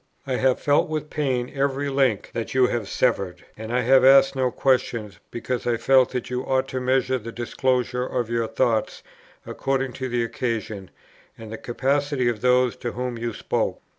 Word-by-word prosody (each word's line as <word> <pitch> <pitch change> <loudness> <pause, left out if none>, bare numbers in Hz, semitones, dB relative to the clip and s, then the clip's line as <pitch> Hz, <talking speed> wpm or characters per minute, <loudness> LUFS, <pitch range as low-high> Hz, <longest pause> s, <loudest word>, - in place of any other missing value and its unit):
I 130 -2 -1
have 130 -1 +2
felt 145 +1 +2
with 155 -1 -4
pain 130 -5 -1
every 140 0 -1
link 135 -6 0
that 115 +2 -4
you 130 -1 +5
have 120 -4 -2
severed, 100 -8 -1
and 110 +1 -7
I 125 +1 +1
have 130 +2 +5
asked 135 +1 +6
no 130 -1 +1
questions, 120 -5 0
because 120 +1 -4
I 120 -1 +1
felt 130 +1 +4
that 125 -2 -4
you 125 0 -2
ought 130 0 0
to 130 - -3
measure 130 0 +1
the 115 +1 -8
disclosure 125 +1 -1
of 120 -2 -2
your 115 -1 -1
thoughts 115 -1 0 0.4
according 135 -1 -2
to 130 -1 -4
the 120 -1 0
occasion, 110 -5 -4 0.5
and 110 -1 -10
the 110 - -5
capacity 135 +1 0
of 110 -3 -4
those 125 -1 +3
to 120 - -5
whom 125 -1 -4
you 120 0 -2
spoke. - - -2
125 Hz, 185 wpm, -24 LUFS, 115-130 Hz, 0.5 s, asked